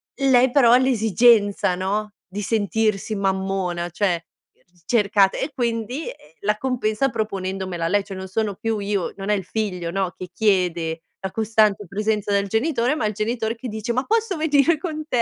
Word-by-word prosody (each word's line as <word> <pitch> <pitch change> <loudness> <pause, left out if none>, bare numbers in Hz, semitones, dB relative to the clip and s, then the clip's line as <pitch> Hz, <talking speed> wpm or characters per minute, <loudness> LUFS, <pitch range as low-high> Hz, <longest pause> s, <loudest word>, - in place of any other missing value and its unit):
lei 260 -2 +4
però 245 -4 +5
ha 245 - +8
l'esigenza, 225 -5 +3
no, 205 +3 -2
di 195 +2 -5
sentirsi 215 0 0
mammona, 190 -3 -1
cioè, 175 -2 0 0.6
cercata, 200 -4 +3
e - - -3
quindi 240 +3 -2 0.4
la 210 +1 +1
compensa 250 0 0
proponendomela 190 -5 -3
lei. 205 +3 +2
Cioè 195 -1 -8
non 190 0 -6
sono 205 +1 -1
più 225 +1 -2
io, 200 -2 -2
non 195 +1 -5
è 210 - +4
il 190 -3 -4
figlio, 185 -6 -3
no, 185 -2 -1
che 185 - -7
chiede 175 -5 0 0.2
la 190 -1 -4
costante 215 -2 +2
presenza 210 +2 -1
del 200 0 +1
genitore, 245 - +1
ma 310 - -1
il 210 - 0
genitore 225 +1 -2
che 245 +2 -7
dice: 220 +2 -3
"Ma 255 +2 -1
posso 440 -4 0
venire 310 +1 +3
con 310 -1 -5
te?" 245 -5 +1
210 Hz, 170 wpm, -22 LUFS, 195-235 Hz, 0.6 s, ha